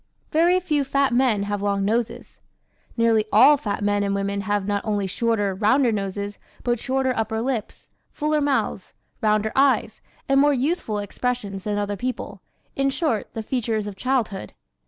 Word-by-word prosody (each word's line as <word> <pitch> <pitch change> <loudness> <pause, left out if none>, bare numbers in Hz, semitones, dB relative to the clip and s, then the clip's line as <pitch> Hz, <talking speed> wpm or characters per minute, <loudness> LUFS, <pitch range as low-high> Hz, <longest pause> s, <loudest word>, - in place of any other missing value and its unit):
Very 345 +3 +4
few 305 -6 0
fat 275 -1 +1
men 240 -5 +2
have 205 0 -3
long 200 -1 0
noses. 225 +2 -2 0.6
Nearly 225 -2 +3
all 265 +8 +7
fat 210 -6 -3
men 205 0 +1
and 200 0 0
women 200 0 -1
have 205 -1 -1
not 205 -1 -1
only 205 -2 -1
shorter, 205 0 0
rounder 230 +6 +3
noses 200 0 -3 0.2
but 240 -1 0
shorter 260 0 0
upper 220 0 -1
lips, 235 -2 -4 0.2
fuller 300 0 0
mouths, 285 -2 -1 0.3
rounder 215 -1 +2
eyes 275 0 +2 0.3
and 275 0 +4
more 290 0 +4
youthful 260 -5 -1
expressions 205 -1 -3
than 210 -1 -1
other 205 0 -2
people 255 +2 -4 0.3
in 275 0 +1
short, 275 -6 -1
the 225 - -3
features 225 -3 -1
of 205 -1 -6
childhood. 225 - -2
225 Hz, 160 wpm, -23 LUFS, 205-265 Hz, 0.6 s, all